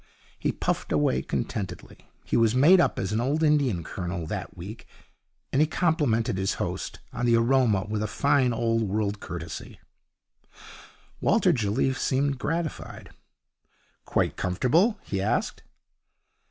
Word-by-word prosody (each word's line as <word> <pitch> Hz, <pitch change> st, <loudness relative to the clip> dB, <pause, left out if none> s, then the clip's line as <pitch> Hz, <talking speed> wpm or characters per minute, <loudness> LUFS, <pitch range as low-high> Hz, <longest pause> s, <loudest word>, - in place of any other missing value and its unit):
He -, -, 0 dB
puffed -, -, -2 dB
away 75 Hz, -4 st, +2 dB
contentedly. 95 Hz, +2 st, -5 dB
He -, -, -2 dB
was 115 Hz, 0 st, +3 dB
made 170 Hz, +8 st, +7 dB
up -, -, +1 dB
as 95 Hz, +1 st, -2 dB
an 110 Hz, +2 st, 0 dB
old 145 Hz, +6 st, 0 dB
Indian 140 Hz, -, +2 dB
colonel 90 Hz, 0 st, -4 dB
that -, -, -6 dB
week, 100 Hz, +6 st, -9 dB, 0.7 s
and 135 Hz, -, +3 dB
he 155 Hz, -, +4 dB
complimented 125 Hz, -, +1 dB
his 95 Hz, 0 st, 0 dB
host -, -, -4 dB, 0.2 s
on 125 Hz, -, -1 dB
the 120 Hz, -, +5 dB
aroma 115 Hz, -4 st, +3 dB
with 105 Hz, 0 st, -2 dB
a 105 Hz, -, -1 dB
fine 130 Hz, +3 st, +2 dB
old 115 Hz, -1 st, 0 dB
world 105 Hz, 0 st, -1 dB
courtesy. 85 Hz, -4 st, -7 dB, 1.4 s
Walter -, -, +3 dB
Jelliffe 125 Hz, +4 st, 0 dB
seemed 135 Hz, +1 st, 0 dB
gratified. 165 Hz, +1 st, -4 dB, 0.9 s
'Quite -, -, 0 dB
comfortable?' 150 Hz, -, +2 dB
he 100 Hz, -1 st, -3 dB
asked. 105 Hz, -, -1 dB
115 Hz, 135 wpm, -26 LUFS, 100-140 Hz, 1.4 s, made